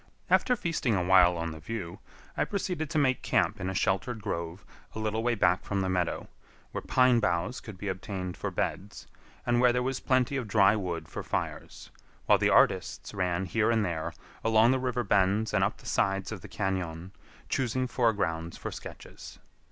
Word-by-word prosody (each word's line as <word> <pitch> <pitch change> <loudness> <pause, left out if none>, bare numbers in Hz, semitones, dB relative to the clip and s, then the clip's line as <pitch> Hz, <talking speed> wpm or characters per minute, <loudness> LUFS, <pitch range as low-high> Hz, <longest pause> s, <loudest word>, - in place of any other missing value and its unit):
After 250 - +4
feasting 155 - 0
awhile 90 -1 +5
on 85 0 -3
the 80 - -8
view, 90 0 -6 0.4
I - - +1
proceeded 180 -6 -3
to 155 - -2
make 130 -4 +2
camp - - +1
in 95 - -2
a 95 - -4
sheltered 105 +6 0
grove 85 -1 -4 0.3
a - - -4
little 110 +1 -1
way 120 0 +1
back 90 -3 +2
from 100 -1 -1
the 95 - -1
meadow, 90 -2 -1 0.4
where - - -4
pine 125 -2 +4
boughs 90 +4 0
could 110 -4 -10
be 100 - -6
obtained 95 -1 -4
for - - -3
beds, 100 +2 -4 0.4
and 120 0 +2
where 125 -1 +6
there 125 +1 0
was 130 0 -2
plenty 130 +1 +1
of 125 -4 -3
dry 100 0 +5
wood 90 -5 -3
for - - -6
fires, - - -5 0.3
while - - +5
the - - +3
artists - - +2
ran 90 -1 -1
here 105 +4 +1
and 110 -2 +2
there, 80 -3 -3 0.3
along 115 +1 +5
the 130 - +2
river 125 -1 -1
bends 100 +1 +2
and - - +3
up - - 0
the - - -18
sides 95 0 0
of 105 -4 -6
the 105 - -11
cañon, 90 -2 -3 0.4
choosing 130 0 0
foregrounds 100 -10 0
for - - -5
sketches. - - -10
100 Hz, 190 wpm, -29 LUFS, 90-120 Hz, 0.4 s, where